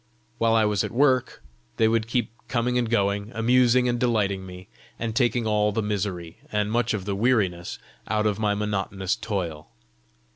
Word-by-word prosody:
While 115 0 +3
I 110 -1 +4
was 105 -3 +1
at - - -3
work, 130 -1 +1 0.3
they 110 - +4
would 115 0 +1
keep 120 -2 -1 0.2
coming 125 0 0
and 120 -2 -1
going, 100 -1 0
amusing 125 +2 +4
and 120 0 0
delighting 100 -6 0
me, 90 +1 -10 0.3
and 115 -1 -3
taking 120 -1 +2
all 105 -1 +2
the 110 +1 -1
misery, 95 -5 -3
and 105 0 0
much 120 0 +1
of 95 -3 -5
the 100 -1 -2
weariness 100 -6 0 0.3
out 110 0 0
of 105 -1 0
my 105 -1 +1
monotonous 100 -2 -2
toil. 85 -8 -4
105 Hz, 175 wpm, -25 LUFS, 100-115 Hz, 0.3 s, I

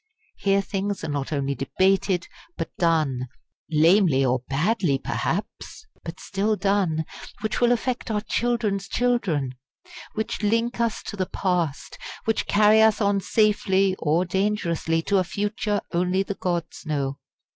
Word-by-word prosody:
Here 195 0 +2
things 195 0 -3
are 160 - -3
not 140 -1 -3
only 140 -2 0
debated, 185 +5 +1 0.3
but - - -5
done 155 -7 +1 0.4
lamely 160 -3 +4
or 130 0 +2
badly, 160 +1 +1
perhaps, 200 - -4 0.2
but 165 0 -7
still 205 +2 0
done 190 -5 +1 0.4
which 220 +2 -2
will 240 0 +5
affect 245 +1 -1
our 210 -2 0
children's 215 -4 -1
children; 190 - 0 0.6
which 220 0 -3
link 230 +3 +1
us 230 -2 0
to - - -6
the 185 -2 -2
Past; 175 -6 -2 0.3
which 225 - 0
carry 210 +1 +5
us 220 -1 +4
on 200 -2 +2
safely 195 -2 +2
or 165 +4 +1
dangerously 170 -4 0
to 200 +2 +2
a - - +2
Future 205 +2 -2
only 180 +2 +1
the 200 - -4
gods 175 -3 -3
know. 140 -4 -2
190 Hz, 140 wpm, -24 LUFS, 165-210 Hz, 0.6 s, will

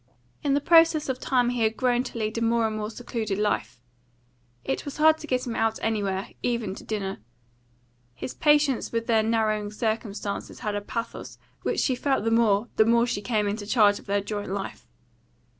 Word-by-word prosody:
In 280 -1 +1
the 290 - +1
process 325 -2 +5
of 255 -1 -2
time 245 -2 +2
he 245 -1 -2
had 220 0 +1
grown 245 -1 +2
to - - -7
lead 215 -1 -2
a 230 - -2
more 230 0 +2
and 220 -1 -1
more 210 0 -3
secluded 220 -3 -4
life. 210 -11 -1 0.8
It 135 - -2
was 285 - -7
hard 315 +1 +5
to 310 - -8
get 255 -2 0
him 235 -2 -4
out 225 0 +1
anywhere, 200 -3 -1
even 235 -5 -1
to - - -10
dinner. 195 -3 -3 1.0
His 130 - -6
patience 295 -4 +2
with 230 0 -1
their 225 -2 +3
narrowing 215 -2 0
circumstances 210 -2 -3
had 210 -3 -2
a 205 - -2
pathos 230 +3 -6 0.2
which - - 0
she 260 - +2
felt 265 -1 0
the 225 - 0
more 225 -1 +3
the 220 - +6
more 235 +1 +4
she 215 -4 -2
came 210 -1 0
into 205 0 -3
charge 210 -3 +4
of - - -18
their 200 0 +1
joint 205 0 -4
life. 195 0 -5
225 Hz, 195 wpm, -26 LUFS, 210-245 Hz, 1.0 s, the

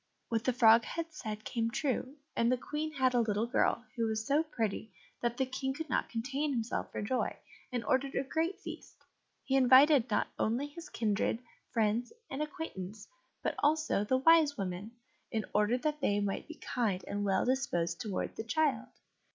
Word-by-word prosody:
What 230 -2 0
the 255 - +4
frog 230 -2 +6
had 330 -1 -4
said 215 -7 -6
came 230 -2 -1
true, 260 +1 -1 0.2
and 235 +1 +3
the 255 - +3
Queen 300 +4 -3
had 260 -3 +2
a 245 - +4
little 215 0 0
girl 235 0 +1
who 230 -2 0
was 220 0 -1
so 285 +5 +3
pretty 225 -8 -3 0.3
that 240 0 -1
the 265 - +2
King 265 +1 -3
could 320 +1 -6
not - - +1
contain 270 +6 -2
himself 230 -2 -2
for - - -3
joy, 255 +5 -1 0.3
and 245 -2 -2
ordered 270 +1 +1
a 270 - +1
great 325 +7 -1
feast. - - -9 0.5
He 270 - 0
invited 265 0 +6
not 210 - +1
only 235 +6 +1
his 320 +3 -10
kindred, 215 -1 0 0.3
friends 225 +1 +1 0.2
and 270 +2 -3
acquaintance, 220 - -6 0.4
but - - 0
also 305 -7 +2
the 255 +5 +2
Wise 305 0 +5
Women, 195 +3 -4 0.4
in 220 -1 -2
order 210 +4 +3
that 300 +2 -2
they 205 -6 +2
might 200 -1 -2
be 320 - -8
kind 215 -10 -1
and 205 0 -2
well 195 -1 +2
disposed 210 -11 0
towards 205 -4 -3
the - - -4
child. 265 -2 +1
245 Hz, 185 wpm, -32 LUFS, 220-285 Hz, 0.5 s, frog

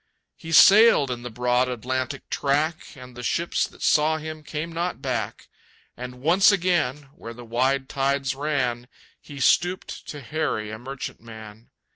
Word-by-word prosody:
He 165 -2 -10
sailed 195 - +7
in 120 -1 -4
the 125 - -6
broad 125 +2 +1
Atlantic 125 +1 -4
track, 150 +3 0
And 125 -1 -12
the 125 - -8
ships 170 +8 -1
that - - -13
saw 155 +1 +3
him 155 0 -7
came 155 +2 -5
not 170 +2 -3
back. 120 -6 -4 0.5
And 125 0 -9
once 180 +7 +5
again, 155 -8 0
where 115 0 -9
the 120 0 -11
wide 130 +4 0
tides 140 0 -1
ran, 135 -4 -2 0.3
He 145 -1 -11
stooped 175 +6 0
to 145 - -7
harry 120 -7 -3
a 110 - -7
merchantman. 115 -4 -9
135 Hz, 150 wpm, -24 LUFS, 125-155 Hz, 0.5 s, sailed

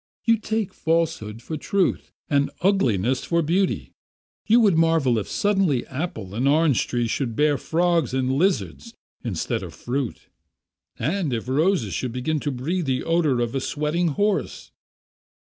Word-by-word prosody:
You 230 -1 +4
take 220 -2 -2
falsehood 150 -10 -1
for 155 - -4
truth 195 +5 0 0.2
and 140 -3 +2
ugliness 130 - +2
for 170 -1 +1
beauty. 185 +5 0 0.6
You 230 +3 +6
would 200 -6 +4
marvel 160 -8 +3
if 105 - -5
suddenly 195 -11 +1
apple 130 - -5
and 125 +6 0
orange 150 -2 +3
trees 120 -2 -1
should 120 -5 -2
bear 150 +2 +3
frogs 170 -3 +1
and 130 0 0
lizards 190 - -1 0.3
instead 100 -10 -2
of - - -8
fruit, 125 -1 -4 0.7
and 160 - -1
if 115 0 -3
roses 140 - +1
should 120 +6 -3
begin 150 +5 -1
to 145 - -2
breathe 155 +6 -2
the 130 -1 0
odour 160 -7 +1
of 120 -1 -1
a 135 - -1
sweating 150 +6 -1
horse. 200 +6 -1
150 Hz, 150 wpm, -23 LUFS, 125-175 Hz, 0.7 s, You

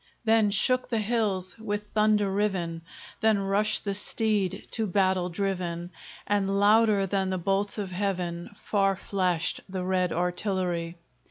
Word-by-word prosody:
Then 220 -1 +4
shook 250 +6 +1
the 235 - 0
hills 210 -3 0
with 210 -1 -4
thunder 210 -2 +2
riven, 185 -5 -1 0.4
Then 220 -1 +3
rushed 200 +3 0
the 200 - -1
steed 205 -1 0
to 220 -2 -1
battle 185 -1 +1
driven, 175 -2 -3 0.3
And 200 -1 +1
louder 210 -1 +4
than 195 0 0
the 185 - -1
bolts 195 +4 0
of 200 -3 -4
heaven 180 -3 -2
Far 195 -2 +1
flashed 185 -3 -1
the 185 -1 -3
red 185 -1 0
artillery. 180 -1 -2
195 Hz, 140 wpm, -27 LUFS, 185-210 Hz, 0.4 s, Then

